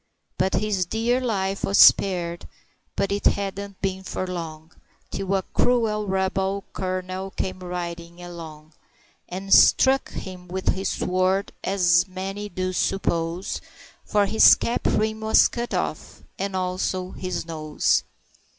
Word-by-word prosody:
But 190 Hz, -, +1 dB
his 200 Hz, -4 st, 0 dB
dear 235 Hz, +5 st, +1 dB
life 195 Hz, -5 st, -1 dB
was 195 Hz, -, +1 dB
spared, 175 Hz, -3 st, +5 dB, 0.5 s
but 195 Hz, -, 0 dB
it 200 Hz, 0 st, +1 dB
hadn't 200 Hz, 0 st, -3 dB
been 190 Hz, -1 st, -1 dB
for 185 Hz, -, -4 dB
long 165 Hz, -3 st, -6 dB, 0.4 s
Till 195 Hz, 0 st, -1 dB
a 190 Hz, -, 0 dB
cruel 220 Hz, -4 st, +1 dB
rebel 190 Hz, +1 st, -1 dB
colonel 185 Hz, 0 st, -3 dB
came 185 Hz, -1 st, -4 dB
riding 175 Hz, -1 st, -6 dB
along, 160 Hz, -3 st, -10 dB, 0.6 s
And 190 Hz, +2 st, -1 dB
struck 270 Hz, 0 st, +5 dB
him 180 Hz, -1 st, -8 dB
with 185 Hz, +1 st, -2 dB
his 190 Hz, +1 st, 0 dB
sword, 185 Hz, +2 st, 0 dB
as 180 Hz, -2 st, +3 dB
many 195 Hz, +2 st, -5 dB
do 185 Hz, 0 st, -3 dB
suppose, 170 Hz, -1 st, -1 dB, 0.4 s
For 205 Hz, -1 st, +2 dB
his 220 Hz, +3 st, +7 dB
cap 235 Hz, -, -2 dB
rim 220 Hz, 0 st, 0 dB
was 220 Hz, 0 st, +5 dB
cut 240 Hz, 0 st, -5 dB
off, -, -, -4 dB, 0.2 s
and 195 Hz, 0 st, -2 dB
also 185 Hz, 0 st, -2 dB
his 185 Hz, -2 st, -4 dB
nose. 155 Hz, -2 st, 0 dB
190 Hz, 130 wpm, -24 LUFS, 180-200 Hz, 0.6 s, his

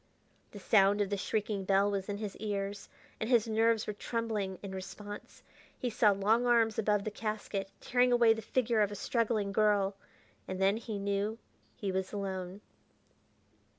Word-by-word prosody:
The -, -, -11 dB
sound 200 Hz, 0 st, +4 dB
of 205 Hz, -1 st, 0 dB
the -, -, +2 dB
shrieking 205 Hz, 0 st, -2 dB
bell 195 Hz, +1 st, +3 dB
was 195 Hz, 0 st, -3 dB
in 205 Hz, -, -2 dB
his 210 Hz, -2 st, -5 dB
ears, 200 Hz, -1 st, -4 dB, 0.3 s
and 220 Hz, -, -2 dB
his 235 Hz, -3 st, +4 dB
nerves 225 Hz, 0 st, +2 dB
were 210 Hz, -, -3 dB
trembling 210 Hz, -3 st, -3 dB
in 200 Hz, -, -6 dB
response. 205 Hz, +2 st, -8 dB, 0.3 s
He 250 Hz, -3 st, -2 dB
saw 215 Hz, -1 st, +4 dB
long 210 Hz, +5 st, +2 dB
arms 230 Hz, -2 st, +3 dB
above 210 Hz, -2 st, +2 dB
the 215 Hz, -, -3 dB
casket, 210 Hz, -2 st, -3 dB
tearing 250 Hz, 0 st, +2 dB
away 235 Hz, -2 st, +6 dB
the 225 Hz, -, -6 dB
figure 230 Hz, 0 st, +1 dB
of 205 Hz, -1 st, +2 dB
a -, -, -5 dB
struggling 215 Hz, -1 st, 0 dB
girl.... 200 Hz, -1 st, +2 dB, 0.5 s
And 185 Hz, -, -4 dB
then 195 Hz, +2 st, +3 dB
he 225 Hz, -2 st, -5 dB
knew 200 Hz, +2 st, -1 dB, 0.4 s
he 200 Hz, -2 st, -3 dB
was 190 Hz, 0 st, -2 dB
alone.... 190 Hz, -1 st, -4 dB
205 Hz, 170 wpm, -32 LUFS, 195-225 Hz, 0.5 s, away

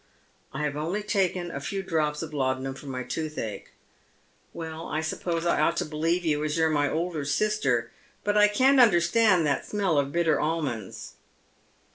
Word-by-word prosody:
" -, -, -38 dB
I 150 Hz, -, -4 dB
have 145 Hz, -1 st, -1 dB
only 170 Hz, +8 st, -2 dB
taken 185 Hz, -4 st, 0 dB
a 140 Hz, -, -4 dB
few 195 Hz, +7 st, -4 dB
drops 155 Hz, -4 st, -1 dB
of 155 Hz, -1 st, -8 dB
laudanum 130 Hz, -1 st, -1 dB
for 140 Hz, -, -12 dB
my 130 Hz, -1 st, -4 dB
tooth 155 Hz, +3 st, -4 dB
ache." 105 Hz, -3 st, -5 dB, 0.4 s
" -, -, -37 dB, 0.3 s
Well, 160 Hz, -1 st, -7 dB
I 155 Hz, -, -2 dB
suppose 165 Hz, +1 st, -2 dB
I 170 Hz, -, +2 dB
ought 170 Hz, -, +2 dB
to -, -, 0 dB
believe 165 Hz, +3 st, -1 dB
you, 150 Hz, -2 st, +1 dB
as 155 Hz, +1 st, -1 dB
you're 160 Hz, -1 st, +3 dB
my 145 Hz, -1 st, +2 dB
elder 165 Hz, 0 st, -2 dB
sister. 140 Hz, -, 0 dB, 0.3 s
But 205 Hz, 0 st, 0 dB
I 210 Hz, 0 st, +6 dB
can't 260 Hz, +6 st, +4 dB
understand 185 Hz, -3 st, +4 dB
that 140 Hz, -2 st, 0 dB
smell 195 Hz, -8 st, +1 dB
of 140 Hz, 0 st, -1 dB
bitter 170 Hz, -1 st, +2 dB
almonds." 150 Hz, -, -3 dB
160 Hz, 185 wpm, -26 LUFS, 145-180 Hz, 0.4 s, I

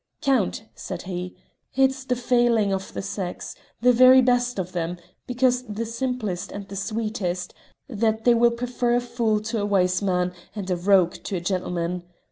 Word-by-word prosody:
"Count," 250 Hz, -6 st, +1 dB
said -, -, -6 dB
he, 180 Hz, -1 st, -5 dB, 0.4 s
"it's 265 Hz, 0 st, +2 dB
the 250 Hz, -, 0 dB
failing 240 Hz, -4 st, +2 dB
of 190 Hz, 0 st, -4 dB
the -, -, -3 dB
sex 185 Hz, -2 st, -5 dB, 0.3 s
the 250 Hz, +1 st, +5 dB
very 255 Hz, +2 st, +8 dB
best 245 Hz, -1 st, +2 dB
of 185 Hz, -1 st, -3 dB
them, 175 Hz, 0 st, -3 dB, 0.3 s
because 250 Hz, 0 st, +2 dB
the 215 Hz, +2 st, -3 dB
simplest 230 Hz, -6 st, -3 dB
and 200 Hz, -1 st, -7 dB
the 200 Hz, -, -7 dB
sweetest 205 Hz, -3 st, -3 dB, 0.3 s
that 220 Hz, -3 st, 0 dB
they 240 Hz, -, +7 dB
will 235 Hz, 0 st, +5 dB
prefer 240 Hz, 0 st, -1 dB
a -, -, +3 dB
fool 235 Hz, -3 st, 0 dB
to 220 Hz, 0 st, -2 dB
a -, -, 0 dB
wise 185 Hz, -2 st, +2 dB
man 180 Hz, -2 st, 0 dB, 0.2 s
and 195 Hz, -3 st, -4 dB
a -, -, +2 dB
rogue 180 Hz, -1 st, +3 dB
to 195 Hz, -, -3 dB
a -, -, -1 dB
gentleman. 180 Hz, -1 st, -2 dB
215 Hz, 175 wpm, -24 LUFS, 185-245 Hz, 0.4 s, very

